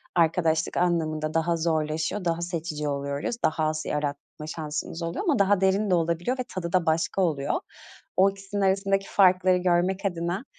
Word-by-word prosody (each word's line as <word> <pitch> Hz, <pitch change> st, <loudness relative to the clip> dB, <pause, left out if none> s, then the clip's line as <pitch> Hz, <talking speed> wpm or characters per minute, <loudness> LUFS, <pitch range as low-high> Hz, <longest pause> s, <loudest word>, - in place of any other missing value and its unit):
arkadaşlık 160 Hz, -1 st, +2 dB
anlamında 155 Hz, -3 st, 0 dB
daha 165 Hz, +1 st, +1 dB
zorlaşıyor, 160 Hz, +3 st, -1 dB
daha 170 Hz, 0 st, 0 dB
seçici 165 Hz, -3 st, -3 dB
oluyoruz, 140 Hz, +7 st, -2 dB
daha 160 Hz, 0 st, +1 dB
az 155 Hz, 0 st, -1 dB
yaratma 150 Hz, +1 st, -4 dB
şansımız 160 Hz, +1 st, -4 dB
oluyor 170 Hz, -, -3 dB
ama 300 Hz, -, +1 dB
daha 200 Hz, -1 st, +3 dB
derin 195 Hz, +2 st, +2 dB
de 180 Hz, -, +4 dB
olabiliyor 170 Hz, +9 st, 0 dB
ve 255 Hz, -, 0 dB
tadı 170 Hz, -2 st, -4 dB
da 180 Hz, -2 st, +3 dB
başka 160 Hz, +4 st, +1 dB
oluyor. 150 Hz, -6 st, 0 dB, 0.6 s
O 195 Hz, +1 st, +6 dB
ikisinin 195 Hz, +1 st, -5 dB
arasındaki 195 Hz, 0 st, +1 dB
farkları 185 Hz, -1 st, +4 dB
görmek 180 Hz, +2 st, +1 dB
adına, 175 Hz, +5 st, -2 dB
170 Hz, 160 wpm, -26 LUFS, 155-190 Hz, 0.6 s, O